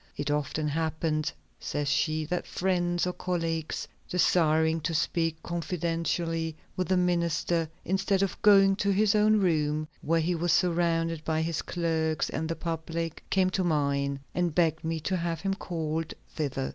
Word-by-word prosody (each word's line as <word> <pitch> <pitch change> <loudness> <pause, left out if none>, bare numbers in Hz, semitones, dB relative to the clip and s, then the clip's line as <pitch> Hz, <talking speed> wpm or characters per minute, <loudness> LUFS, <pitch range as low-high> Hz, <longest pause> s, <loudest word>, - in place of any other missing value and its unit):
"It 145 0 -1
often 150 +1 -1
happened," 155 0 -1 0.3
says 145 -1 -2
she, 155 +3 +1
"that 180 +3 -3
friends 175 -2 0
or 180 - -1
colleagues 165 -3 -2 0.2
desiring 160 -2 +3
to 160 +2 -2
speak 165 +1 0
confidentially 165 -1 -2 0.2
with 185 - -1
the 185 - +2
minister, 170 -2 +1 0.2
instead 195 +1 +1
of 195 - -3
going 195 -2 +6
to 200 - 0
his 200 +1 +3
own 215 0 +4
room, 155 -4 +1
where 165 +2 +2
he 175 +3 +1
was 170 0 +1
surrounded 165 -3 +1
by 160 0 0
his 165 -1 -1
clerks 160 -2 -1
and 160 +1 -2
the 165 - -1
public, 165 0 -4
came 185 -1 +2
to 190 - 0
mine 140 -4 0
and 175 -3 0
begged 160 -3 +2
me 160 0 -1
to 185 +4 -1
have 165 -2 -2
him 195 0 0
called 160 -4 -3 0.2
thither. 135 -3 -2
165 Hz, 160 wpm, -28 LUFS, 155-180 Hz, 0.3 s, going